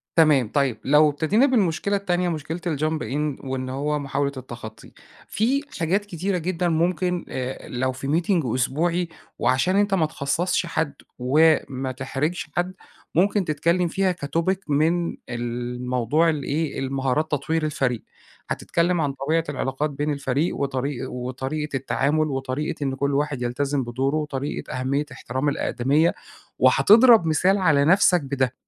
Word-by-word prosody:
تمام 150 -7 +5
طيب. 135 -6 +1
لو 150 +2 +5
ابتدينا 160 - +2
بالمشكلة 200 - +1
التانية، 180 -3 0
مُشكلة 160 0 -4
الjump 155 -2 -1
in 145 +4 -3
وإن 130 -1 -3
هو 145 +3 -1
مُحاولة 140 0 -1
التخطي 120 -4 -9 0.4
في 255 +6 +1 0.2
حاجات 185 +5 +1
كتيرة 185 0 -2
جدًا 175 +1 -1
مُمكن 175 +1 0
آآ 130 0 -5
لو 130 +1 -1
في 130 +1 -6
meeting 175 -4 +1
أسبوعي 170 +7 0 0.3
وعشان 135 +9 +2
أنت 205 0 +2
ما 175 -5 +3
تخصَصش 160 +5 -1
حد، 160 -3 -1 0.3
وما 135 -1 +2
تحرجش 135 +6 -3
حد، 180 +1 -1 0.4
مُمكن 195 +3 +3
تتكلم 170 +4 +1
فيها 185 +1 0
كtopic 165 +6 +1
من 160 +4 +1
الموضوع 125 +5 -1
ال 150 -3 -1
إيه 150 +2 -2
المهارات 135 +3 -1
تطوير 155 +2 0
الفريق. 135 -6 -1 0.5
هتتكلم 175 0 0
عن 145 -2 0
طبيعة 150 +5 0
العلاقات 135 +1 -2
بين 145 +1 -2
الفريق 140 +3 -1
وطريق 135 -1 -2
وطريقة 130 +4 -4
التعامل، 145 +4 0
وطريقة 135 +2 -3
إن 135 -1 -1
كل 140 +1 -1
واحد 145 -2 -1
يلتزم 135 +3 -1
بدوره، 130 +4 -1
وطريقة 150 -2 -3
أهمية 140 +3 0
احترام 130 +2 -2
الأقدمية، 145 +4 +1 0.5
وهتضرب 210 - +6
مثال 180 +5 +3
على 150 -7 +3
نفسك 180 +1 +5
بده. 135 -2 -1
150 Hz, 140 wpm, -23 LUFS, 135-170 Hz, 0.5 s, وهتضرب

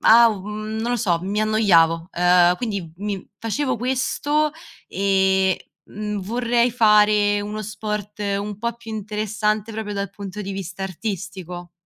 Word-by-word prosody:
ha 235 +1 +7
u 210 -3 -3
mhmm, 215 +1 -4
non 240 +2 -1
lo - - +1
so, 180 -7 +1
mi 200 +3 -1
annoiavo, 170 -6 +3
ehm, 180 0 +4
quindi 200 -8 -4
mi 200 0 -4
facevo 255 +4 -1
questo 270 +5 0 0.4
e, 190 0 +2 0.2
mhmm, 210 0 -4
vorrei 235 +3 +1
fare 210 -2 +4
uno 210 +1 -4
sport 210 0 -5 0.2
un 205 0 -4
po' 235 +1 -2
più 230 -1 -9
interessante, 215 +1 -2
proprio 215 -1 -4
dal 200 -1 -3
punto 200 0 -7
di 195 - -5
vista 195 0 -6
artistico. 185 -2 -6
210 Hz, 145 wpm, -22 LUFS, 190-220 Hz, 0.4 s, ha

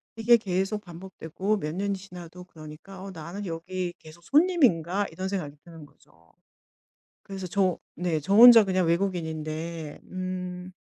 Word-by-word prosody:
이게 235 +1 +5
계속 195 +1 -2
반복되고 185 +2 -4
몇 155 -4 -4
년이 200 +1 -1
지나도 180 -2 -11
그러니까 165 +3 -12
'어 195 - -7
나는 175 +4 -7
여기 175 +1 -4
계속 160 +2 -15
손님인가?' 205 - +2
이런 190 0 -5
생각이 155 -7 -4
드는 165 -3 -12
거죠. 80 - -26 0.9
그래서 195 -2 -7
저 185 -1 +1 0.2
네, 170 -2 -1
저 165 +7 -2
혼자 235 0 +10
그냥 185 -3 0
외국인인데 160 -3 -3
음 185 0 -6
180 Hz, 300 characters per minute, -26 LUFS, 165-195 Hz, 0.9 s, 혼자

